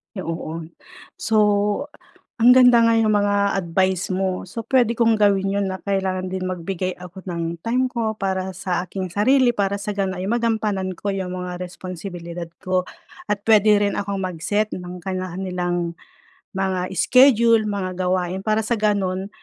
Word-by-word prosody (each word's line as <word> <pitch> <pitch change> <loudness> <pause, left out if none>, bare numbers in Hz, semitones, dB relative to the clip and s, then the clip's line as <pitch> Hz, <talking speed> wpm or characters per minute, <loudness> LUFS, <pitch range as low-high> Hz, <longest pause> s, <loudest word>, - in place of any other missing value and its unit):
Ay 190 - -4
oo. 165 0 -5 0.6
So, 225 - -3 1.1
ang 235 +2 +6
ganda 245 -2 +7
nga 230 - +4
nung 215 -1 +3
mga 205 -1 +1
advice 185 +1 0
mo. 185 -1 -2
So, 230 +5 -6
puwede 240 -1 +2
kong 230 -1 +3
gawin 200 -2 +3
'yun 200 - 0
na 190 - -4
kailangan 190 -2 -1
din 185 0 -3
magbigay 185 0 -3
ako 180 +1 -10
ng 170 -1 -3
time 250 +3 +1
ko 230 -3 -2
para 190 -1 -2
sa 180 0 -2
aking 185 -1 -5
sarili 250 +7 +3
para 200 -1 0
sa 200 +1 -4
gano'n 190 -2 -2
ay - - -3
magampanan 215 -5 0
ko 200 +3 -3
'yung 190 -2 -3
mga 180 -1 -5
responsibilidad 175 -1 -7 0.2
ko. 185 0 +1 0.5
At 205 -1 0
puwede 215 -1 +5
rin 200 -1 +1
akong 200 -1 -3
mag-set 190 +4 -1
ng 180 0 -7
kani-kanilang 180 -2 -3 0.6
mga 185 -1 -1
schedule, 235 -4 +5
mga 195 -2 -2
gawain 185 0 -1
para 215 +2 +1
sa 235 - 0
gano'n, 195 -2 0
190 Hz, 160 wpm, -22 LUFS, 185-210 Hz, 1.1 s, ganda